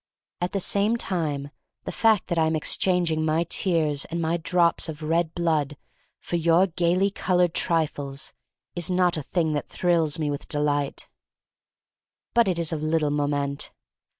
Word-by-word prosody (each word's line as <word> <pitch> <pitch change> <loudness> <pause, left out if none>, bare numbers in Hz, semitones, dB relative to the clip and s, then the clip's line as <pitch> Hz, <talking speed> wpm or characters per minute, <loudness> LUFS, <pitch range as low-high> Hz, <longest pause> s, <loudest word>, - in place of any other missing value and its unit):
At 175 - -2
the 200 - 0
same 205 +5 +1
time, 150 -9 -2 0.3
the - - -4
fact 220 -4 +3
that 170 -2 +1
I 160 - +3
am 160 - 0
exchanging 165 0 +1
my 160 +1 +2
tears 160 -5 0
and 170 - -4
my 165 0 0
drops 170 +1 +1
of 155 0 -7
red 165 +1 0
blood 155 -4 0 0.4
for 175 - -3
your 170 +2 +4
gayly 180 +2 +1
colored 180 -3 +1
trifles 145 -5 -1 0.4
is 175 -1 -1
not 180 -1 +3
a 155 - -1
thing 160 +2 -1
that 145 - -3
thrills 165 -4 +1
me 150 -2 -1
with 145 - -5
delight. 145 -1 -1 1.3
But 235 -3 +4
it's 170 -3 0
of 155 -2 -3
little 155 -1 +1
moment. 145 -1 -1
165 Hz, 155 wpm, -25 LUFS, 150-175 Hz, 1.3 s, your